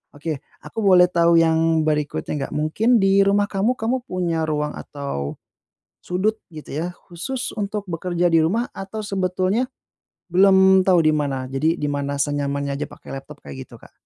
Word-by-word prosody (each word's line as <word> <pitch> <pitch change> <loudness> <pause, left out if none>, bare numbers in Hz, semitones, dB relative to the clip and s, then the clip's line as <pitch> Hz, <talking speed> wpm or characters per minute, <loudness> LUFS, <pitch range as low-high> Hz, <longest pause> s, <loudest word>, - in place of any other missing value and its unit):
Oke, 150 0 -4 0.2
aku - - -7
boleh 180 -2 +6
tahu 170 -1 +4
yang 160 0 +3
berikutnya 150 -1 -1
enggak, 140 - -4
mungkin 215 +11 +2
di 195 0 +4
rumah 205 +1 +2
kamu, 205 +5 +1
kamu 240 +3 -1
punya 170 -3 -1
ruang 150 -1 -2
atau 140 - -5 0.7
sudut, 210 +5 -1
gitu 155 - -10
ya, - - -2 0.2
khusus 245 +10 -4
untuk 205 0 -3
bekerja 175 +1 0
di 165 - +5
rumah 225 +9 0
atau 195 +3 -6
sebetulnya 190 +4 0 0.6
belum 190 0 +6
tahu 180 -2 +5
di 155 - +4
mana? 140 -3 -2
Jadi 155 +5 +1
di 145 - -2
mana 140 0 -2
senyamannya 140 -1 -1
aja - - -2
pakai - - -14
laptop, 145 +1 -15
kayak 130 -1 -8
gitu, 120 - -14
Kak? - - -16
170 Hz, 165 wpm, -22 LUFS, 150-195 Hz, 0.7 s, boleh